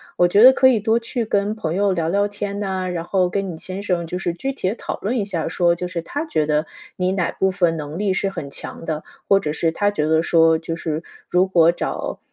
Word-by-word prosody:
我 175 - +4
觉 200 +4 +4
得 260 +1 +10
可 260 0 +5
以 240 -4 +3
多 220 +2 +2
去 235 0 -3
跟 205 0 0
朋 170 -7 -3
友 200 +1 +2
聊 170 -3 -1
聊 200 +4 +1
天 205 0 -4
呐， 190 -2 -2
然 175 -2 -3
后 180 +1 +1
跟 195 0 -2
你 165 - -8
先 190 +4 -6
生 175 -4 -1
就 180 - -4
是 175 -2 -2
具 270 +11 -3
体 185 -8 -2
地 210 - -3
讨 - - -5
论 230 +6 -1
一 210 - 0
下 180 -5 -3
说， 170 0 +2
就 180 - -4
是 175 -1 -4
他 290 - -4
觉 155 - 0
得 150 +1 +1 0.3
你 185 0 0
哪 185 -3 0
部 190 0 +1
分 175 -3 +1
能 150 +2 -6
力 200 -2 +1
是 195 +1 0
很 165 -7 -6
强 140 - -7
的。 155 -1 -3 0.2
或 195 - +5
者 150 -6 -3
是 165 +1 0
他 205 +4 +1
觉 155 -7 -1
得 160 +1 +3
说， 165 -1 +4
就 165 0 -5
是 160 -1 -3 0.3
如 180 +2 +3
果 170 -3 +5
找， 175 - -4
185 Hz, 275 characters per minute, -21 LUFS, 165-200 Hz, 0.3 s, 得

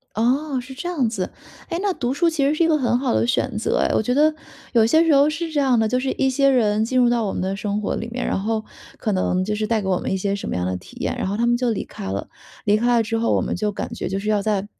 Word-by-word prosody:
哦， 260 +5 +1
是 265 +2 -10
这 295 +6 -5
样 290 -10 0
子。 195 -5 -3 0.4
哎， 335 - -2
那 400 0 +1
读 255 -7 -2
书 340 +5 +2
其 310 -4 0
实 285 +2 +2
是 335 - +2
一 330 - +2
个 315 - +4
很 245 -3 +1
好 255 -2 0
的 - - +2
选 245 -1 0
择 220 - 0
哎。 - - +1
我 - - +2
觉 245 +3 0
得 305 +3 +4 0.4
有 230 -2 +5
些 315 +8 +4
时 325 -3 +4
候 280 +1 +5
是 325 +1 -4
这 295 - +1
样 260 -4 +3
的， 220 - +2
就 250 +3 0
是 265 +1 -1
一 265 - +1
些 275 +1 +3
人 220 -5 +3
进 255 +3 0
入 245 -1 +5
到 235 -2 +1
我 195 - -2
们 - - -3
的 190 +1 -1
生 205 0 -2
活 215 - -2
里 230 - -4
面， 245 +1 -3
然 - - 0
后 220 +2 -1 0.3
可 215 - -1
能 185 0 +1
就 210 +2 -1
是 215 0 -1
带 225 0 +1
给 190 - -3
我 185 -2 +2
们 - - -3
一 - - +1
些 195 +1 -1
什 200 - -5
么 - - -2
样 90 - -1
的 95 0 -1
体 90 - -13
验， - - -1
然 - - -1
后 200 - -1
他 235 +2 +1
们 240 0 +3
就 245 -1 0
离 220 - -2
开 - - -9
了。 100 +1 -4 0.4
离 210 0 +4
开 240 +2 +2
了 230 - +4
之 225 +1 -2
后， 230 - +1
我 - - +2
们 - - -2
就 210 -1 -1
感 205 - -5
觉 - - -4
就 195 +1 -2
是 210 - -4
要 210 -1 +2
再 205 -1 0
235 Hz, 350 characters per minute, -22 LUFS, 210-270 Hz, 0.4 s, 有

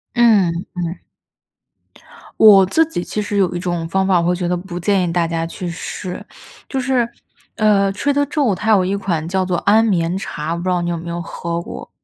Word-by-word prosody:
嗯 200 -8 +3 0.2
嗯。 170 +1 -3 1.4
我 200 -3 +8
自 320 - +3
己 175 - -3
其 210 - -3
实 205 0 -3
有 185 -2 +2
一 - - -2
种 175 -2 -2
方 190 +3 0
法， 185 -2 +4
我 170 - 0
会 180 - +2
觉 175 0 -2
得 180 0 0
不 175 0 -7
建 195 +1 +1
议 170 -2 -2
大 170 -1 +1
家 165 0 -2
去 175 +2 -6
试， 180 +1 -6 0.4
就 270 - -3
是， 250 -2 +1 0.5
呃 200 -2 +3
，Trader 285 +7 +1
Joe's， 280 -7 0
它 220 +5 0
有 200 -4 +5
一 190 +2 -1
款 175 -5 -2
叫 185 +1 0
做 180 -1 -1
安 220 +3 +4
眠 175 -4 0
茶， 155 -4 -5
我 - - -3
不 170 - -5
知 185 - -1
道 180 -1 +1
你 175 - -2
有 170 - -2
没 170 +1 -7
有 170 0 -3
喝 170 0 -4
过？ - - -9
185 Hz, 275 characters per minute, -19 LUFS, 170-205 Hz, 1.4 s, 我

